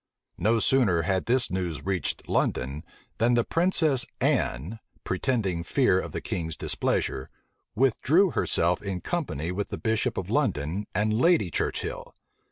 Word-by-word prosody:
No 115 +2 +3
sooner 105 -9 +3
had 95 +2 0
this 125 +1 +2
news 90 -5 -3
reached 95 -3 -2
London, 70 +4 -1 0.4
than 120 +2 +3
the 120 - +3
princess 165 -5 +3 0.2
Anne, 85 - 0 0.2
pretending 95 -4 -1
fear 95 -1 +2
of - - -5
the - - -4
king's 80 -3 -4
displeasure, 65 - -1 0.5
withdrew 145 - +3
herself 85 -8 +1
in 95 -3 -4
company 85 - -3
with 100 +2 -3
the - - -4
bishop 110 -1 -1
of - - -4
London 80 +9 0
and 105 +2 +1
Lady 125 - +3
Churchill. - - -3
100 Hz, 140 wpm, -26 LUFS, 85-125 Hz, 0.5 s, No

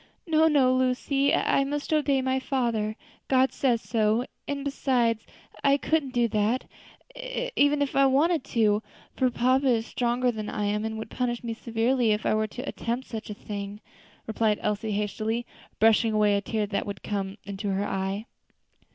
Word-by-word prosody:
"No, 320 -1 +4
no, 275 -5 +4
Lucy, 260 +2 +1
I 275 - +2
must 290 +2 -3
obey 280 -3 +2
my 260 0 +1
father; 235 -6 -1 0.3
God 260 0 +3
says 245 -4 +1
so; 220 +1 +1 0.2
and 280 0 -3
besides, 245 -5 0 0.4
I 280 0 +5
couldn't 305 -1 0
do 240 -1 +3
that 215 +4 0 0.5
if - - 0
I 275 0 +5
wanted 300 +3 +2
to, 215 -4 +2 0.3
for 255 - +2
papa 255 +3 +2
is 230 -3 +2
stronger 245 +1 0
than 215 -2 -5
I 210 -4 -2
am, 210 +1 0
and 220 0 -3
would 220 0 -7
punish 245 -1 -2
me 230 -1 -3
severely 230 +1 +1
if 210 - -3
I - - +3
were 215 0 +1
to 245 +4 -7
attempt 240 +3 -3
such 220 -2 -6
a 210 - -5
thing," 205 0 -6 0.5
replied 220 -1 +1
Elsie 210 +1 -1
hastily, 215 +3 -2 0.3
brushing 225 +1 +4
away 210 -1 +3
a 200 - +1
tear 215 +1 -1
that 200 0 -3
would 200 -1 -6
come 195 -1 -3
into 200 +1 -4
her 195 +1 0
eye. 195 +2 -2
235 Hz, 170 wpm, -27 LUFS, 215-265 Hz, 0.5 s, I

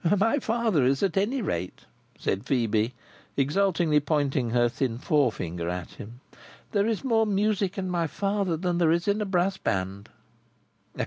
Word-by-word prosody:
"My 225 +8 +2
father 225 - +1
is, 135 +5 +2
at 195 - +1
any 225 +6 0
rate," 90 - -4 0.3
said 95 +2 -2
Phœbe, 115 -3 +1 0.4
exultingly 165 +1 +2
pointing 140 -4 0
her 120 +1 +3
thin 120 -1 -2
forefinger 90 - 0
at 90 -1 -4
him. 120 +5 -11 0.5
"There 205 0 +2
is 225 +1 -1
more 225 -4 +2
music 200 -1 0
in 190 -1 -2
my 175 -2 0
father 195 -1 -1
than 175 0 -1
there 165 -2 +4
is 170 +3 0
in 205 +1 +1
a - - 0
brass 190 0 +1
band." 95 - -3
165 Hz, 155 wpm, -26 LUFS, 120-200 Hz, 0.5 s, there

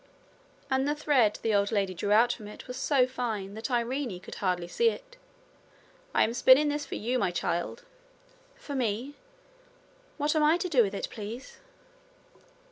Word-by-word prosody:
And 265 +1 +2
the 295 - +1
thread 265 -8 +2
the 225 - +1
old 200 +1 +2
lady 200 -3 0
drew 200 +4 -3
out 235 +3 +5
from 215 -3 -10
it 210 - -11
was 250 - -6
so 265 0 +3
fine 225 -6 -4
that 220 +5 -5
Irene 240 -4 -1
could - - -11
hardly 180 -3 -1
see 465 - +2
it. - - -9 1.0
'I - - +5
am 230 - 0
spinning 260 +5 +6
this 290 0 -3
for - - -5
you, 245 +4 -1
my - - +1
child.' 175 - -2 0.7
'For 285 - -8
me! 250 +1 -2 1.0
What 300 +1 0
am 310 - +3
I 305 +3 +4
to 360 +1 -3
do 270 -7 +5
with 200 -2 0
it, - - -3
please?' 225 +4 -8
240 Hz, 175 wpm, -28 LUFS, 205-285 Hz, 1.0 s, spinning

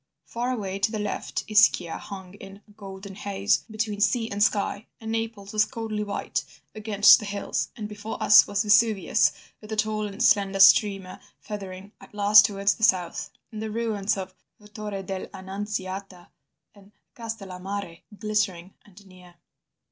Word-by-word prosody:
Far 240 +8 -3
away 200 -5 -4
to 205 +2 +1
the 220 - -3
left 210 -1 -3
Ischia 205 -5 +3
hung 190 -2 -9
in 200 0 -13
a - - -20
golden 195 -1 -10
haze 200 +1 -1
between 215 -1 -3
sea 225 +1 +1
and 200 +1 -3
sky, 205 +1 +1
and 225 0 -6
Naples 225 -3 -4
was 215 0 +4
coldly 220 -2 -4
white 205 -1 -3 0.3
against 205 -1 +5
the 210 - -7
hills, 200 0 -3
and 210 -2 -5
before 210 +1 -7
us 210 0 +7
was 205 +1 0
Vesuvius 210 -8 +3 0.3
with 215 0 -12
a - - -1
tall 215 0 -1
and 200 -1 -4
slender 195 -1 +3
streamer 195 -1 +5 0.2
feathering 195 -2 -8
at - - -16
last 210 +1 +7
towards 200 -1 +1
the 220 - -9
south, 180 -5 +1 0.2
and 215 -1 -7
the 220 - -4
ruins 215 -3 -1
of 190 -1 -6 0.4
Torre 210 -2 -5
dell' 190 0 -5
Annunziata 190 -1 -6 0.4
and 200 0 -20 0.2
Castellammare 195 -5 -6 0.2
glittering 200 -4 -2
and 205 0 -18
near." 180 -2 -17
205 Hz, 155 wpm, -25 LUFS, 195-215 Hz, 0.4 s, us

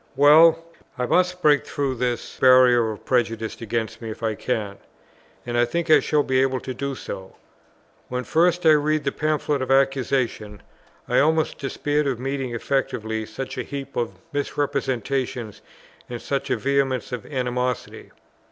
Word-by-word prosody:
Well, 160 +3 +6 0.3
I 125 - -1
must 180 +5 +1
break 145 -1 +5
through 140 -2 -2
this 125 -1 -3
barrier 125 -3 +6
of 105 - -10
prejudice 115 -3 -1
against 115 0 -3
me 115 - -6
if 110 - -8
I 110 -1 0
can; 105 -3 -3 0.7
and 120 0 -4
I 120 - +4
think 160 +7 -1
I 155 - +8
shall 145 +2 +1
be 130 -1 +1
able 130 -1 +1
to 130 - -5
do 140 +2 -4
so. 95 -5 -8 0.7
When 125 0 -3
first 175 +3 +2
I 160 - +8
read 150 0 +2
the 140 - 0
Pamphlet 150 -2 -1
of 130 - -3
Accusation, 130 -6 0 0.4
I 125 - +2
almost 160 +2 +1
despaired 145 +1 -1
of 130 -4 -2
meeting 135 -2 -3
effectively 110 -4 -2
such 130 +5 -6
a - - -2
heap 140 -1 -7
of 120 -2 -2 0.2
misrepresentations 135 -5 -2 0.5
and 120 -1 -5
such 140 +2 -3
a - - +1
vehemence 135 -2 0
of 125 -3 -5
animosity. 125 -3 -3
130 Hz, 160 wpm, -23 LUFS, 120-145 Hz, 0.7 s, I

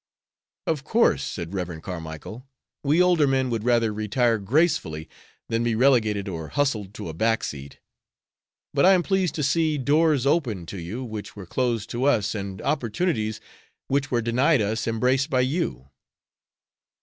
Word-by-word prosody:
"Of 155 -4 -1
course," 230 +10 +2
said 85 0 -5
Rev. 90 -4 -4
Carmicle, 90 - -7 0.4
"we 150 +5 +4
older 175 -5 +4
men 130 -2 +1
would 115 -2 -2
rather 115 -2 +2
retire 110 +2 +1
gracefully 100 - 0 0.4
than 115 0 0
be 120 -1 +1
relegated 110 -5 +3
or 80 -4 -5
hustled 110 - -1
to - - -6
a 80 - -5
back 110 +7 +1
seat. 70 -1 -7 0.9
But 140 - +2
I 190 +2 +7
am 180 -2 +3
pleased 190 -2 0
to 150 - -1
see 155 +2 +2
doors 145 0 +2
open 125 - 0
to 95 +3 -7
you 100 +10 -5
which 110 -4 -7
were 100 -2 -8
closed 120 +2 -1
to 120 +3 -1
us, 115 -8 +2
and 100 -3 -5
opportunities 115 - -1 0.5
which 140 0 0
were 120 -2 0
denied 130 +6 +3
us 105 +1 -1
embraced 125 +4 +1
by 130 -1 +2
you." 130 - -2
120 Hz, 160 wpm, -24 LUFS, 100-140 Hz, 0.9 s, I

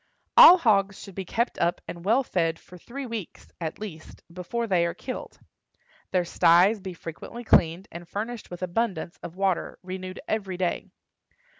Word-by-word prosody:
All 360 - +11
hogs 200 - +2
should 195 - -10
be 190 +1 -5
kept 235 +6 -1
up 170 +1 +1
and 170 -1 -7
well 230 +8 +3
fed 165 -7 0
for 180 - -16
three 260 +10 -8
weeks, 225 -7 -7
at 160 -1 -3
least, 175 -7 -9
before 210 +7 -3
they 185 -6 +2
are 170 - -4
killed; 255 - -7 0.7
their 180 -1 +1
styes 175 +6 +4
be 185 -2 -7
frequently 170 +9 -8
cleaned, 170 -4 +3
and 170 0 -10
furnished 225 +4 -5
with 175 +1 -7
abundance 185 -2 -2
of 170 - -8
water, 190 -2 -1
renewed 185 0 -6
every 195 -4 -2
day. 180 -1 -1
185 Hz, 165 wpm, -26 LUFS, 175-220 Hz, 0.7 s, All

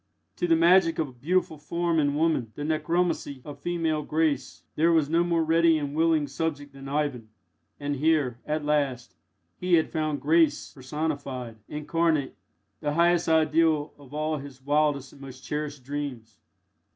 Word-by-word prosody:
To 175 - 0
the 165 - +5
magic 170 0 +4
of 155 -3 -1
a - - -15
beautiful 160 +4 -1
form 170 +2 0
in 145 -1 +1
woman 150 -8 +1
the 145 - -5
necromancy 160 -1 -1
of 145 - -9
female 165 -3 -1
grace 150 -3 -1
there 165 +2 +3
was 155 -3 +2
no 170 +1 +3
more 170 -1 +1
ready 165 0 +4
and 145 -2 -3
willing 160 -1 +2
subject 145 0 -4
than 135 0 -9
Ivan; 140 -6 -2 0.5
and 145 0 -2
here, 145 -5 +1
at 155 0 -1
last, 135 -8 0 0.5
he 180 -1 +3
had 160 - +1
found 155 -2 -1
grace 160 +2 +2
personified, 135 -4 -4
incarnate, 155 -1 0 0.4
the 150 -1 -2
highest 170 0 +3
ideal 160 -1 +2
of 140 -2 -15
all 155 +1 -1
his 140 -2 -10
wildest 145 0 0
and 140 - -16
most 130 -1 -10
cherished 150 -2 -4
dreams. 130 -6 -6
150 Hz, 160 wpm, -26 LUFS, 140-165 Hz, 0.5 s, the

